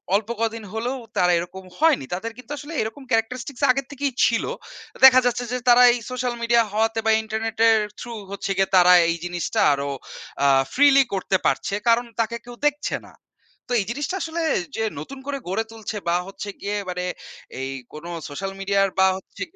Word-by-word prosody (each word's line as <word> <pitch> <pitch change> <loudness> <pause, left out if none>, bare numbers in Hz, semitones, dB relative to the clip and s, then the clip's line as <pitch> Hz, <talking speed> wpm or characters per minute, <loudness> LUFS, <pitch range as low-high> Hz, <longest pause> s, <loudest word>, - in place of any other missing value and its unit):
অল্প 210 +2 0
কদিন 225 0 -1
হলেও 240 +4 -2 0.2
তারা 180 0 +4
এরকম 185 +2 -7 0.2
হয়নি। 310 - +3
তাদের 225 +6 -3
কিন্তু 250 +1 -12
আসলে 290 +4 -8
এরকম 220 +6 -5
characteristics 245 +4 -1
আগের 270 +1 +2
থেকেই 280 -1 -2
ছিল। - - +1 0.6
দেখা 255 -1 +9
যাচ্ছে 245 0 0
যে 250 - 0
তারা 245 +1 +8
এই - - -1
social 250 -1 -2
media 235 0 +4
হওয়াতে 225 +1 +1
বা 220 - +4
internet 220 +1 -4
এর 220 - +5 0.2
through 235 -3 -7
হচ্ছে 200 0 -4
গিয়ে, 195 0 +2
তারা 180 0 +7 0.2
এই 170 - +1
জিনিসটা 175 -1 -2
আরো 140 0 -2 0.5
আ - - +6 0.3
freely 275 0 +6
করতে 190 0 +1
পারছে। - - 0
কারণ 235 +1 +4
তাকে 230 +1 0
কেউ 245 0 -10
দেখছে 295 0 -1
না। - - -17 0.5
তো - - -10
এই - - -5
জিনিসটা 290 +8 -3
আসলে 325 +1 -3 0.3
যে 225 - -1 0.2
নতুন 275 0 -8
করে 285 -1 -2
গড়ে 195 +5 0
তুলছে 220 -1 -6
বা 170 - +2
হচ্ছে 195 +1 -7
গিয়ে 205 +1 -2
মানে, 180 0 -3 0.5
এই 135 0 -3 0.2
কোন 155 +2 -9 0.2
social 195 +7 -5
media 200 0 0
এর 195 - -3
বা 190 - +6
হচ্ছে 190 +1 -14
225 Hz, 185 wpm, -23 LUFS, 195-255 Hz, 0.6 s, দেখা